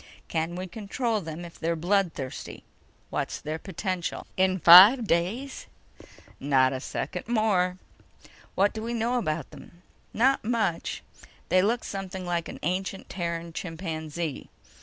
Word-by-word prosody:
Can 165 +1 -2
we 185 +1 -4
control 220 +3 -2
them 165 0 -7
if 170 - -12
they're 165 +1 0
bloodthirsty. 170 -6 -2 0.5
What's - - -2
their 155 +1 -4
potential?" 185 -1 -4
"In 185 0 +2
five 190 - +9
days?" 205 +10 -1 0.7
"Not 135 -2 +3
a 130 - -3
second 180 +7 -5
more." 200 -6 +1 0.8
"What 200 +2 +3
do 220 - -5
we 235 +2 -3
know 235 +2 0
about 155 - -3
them?" 175 +1 -15 0.3
"Not 265 +4 +2
much. 215 -7 -1 0.5
They 185 +1 +5
look 225 +4 +1
something 190 -1 -5
like 170 -1 -2
an - - -7
ancient 190 +3 -3
Terran 170 -2 -4
chimpanzee 160 -3 -5
180 Hz, 135 wpm, -27 LUFS, 165-205 Hz, 0.8 s, five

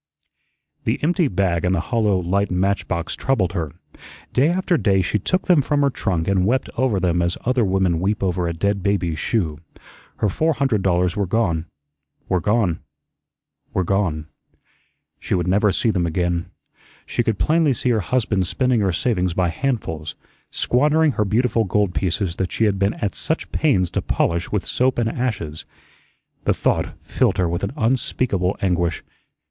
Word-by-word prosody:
The - - 0
empty 175 +1 +2
bag 90 -5 0
and 90 +1 +2
the - - 0
hollow, 110 -5 +2
light 95 +3 0
match 95 +1 0
box 85 -1 -2
troubled 100 -10 0
her. 80 -5 -2 0.6
Day 140 +5 +4
after 180 0 +1
day 95 - +2
she 105 +4 0
took 185 - -1
them 175 -5 +5
from 145 +1 0
her 140 - +3
trunk 90 -9 -1
and 95 -2 +2
wept 120 +7 0
over 120 -6 +1
them 90 -1 +1
as 85 0 0
other 125 -1 +2
women 95 -4 +1
weep 100 +4 -1
over 90 -2 0
a - - -1
dead 100 +4 0
baby's 90 -5 0
shoe. 85 -10 -1 0.6
Her 105 - 0
four 160 - +1
hundred 135 -8 +1
dollars 90 -1 +1
were 100 -2 -1
gone, 85 -6 0 0.6
were 90 - +1
gone, 105 -5 +1 1.0
were 95 - +2
gone. 85 -5 0 0.9
She - - -1
would 90 -1 -1
never 100 +2 +3
see 110 +4 +1
them 90 -4 0
again. 85 +1 -1 0.6
She - - -1
could 110 -3 0
plainly 155 - +2
see 125 - -1
her 115 -3 +2
husband 100 -3 0
spending 125 +3 +1
her 100 -3 +2
savings 90 -3 0
by 90 -2 +2
handfuls; 80 - -3 0.3
squandering 150 +4 +2
her 105 -4 0
beautiful 115 +3 +1
gold 100 -1 0
pieces 90 -1 -1
that 95 - -2
she - - 0
had 100 -3 +2
been 100 +1 +1
at 100 -4 -2
such 160 - -2
pains 95 - +2
to - - -1
polish 85 +2 -1
with 105 -3 -1
soap 130 +1 +1
and 115 -2 +1
ashes. 100 -12 -3 0.8
The - - +2
thought - - 0
filled - - +1
her 90 - +2
with 85 +2 -3
an 100 - -2
unspeakable 110 -5 0
anguish. 85 -3 0
100 Hz, 175 wpm, -21 LUFS, 90-120 Hz, 1.0 s, them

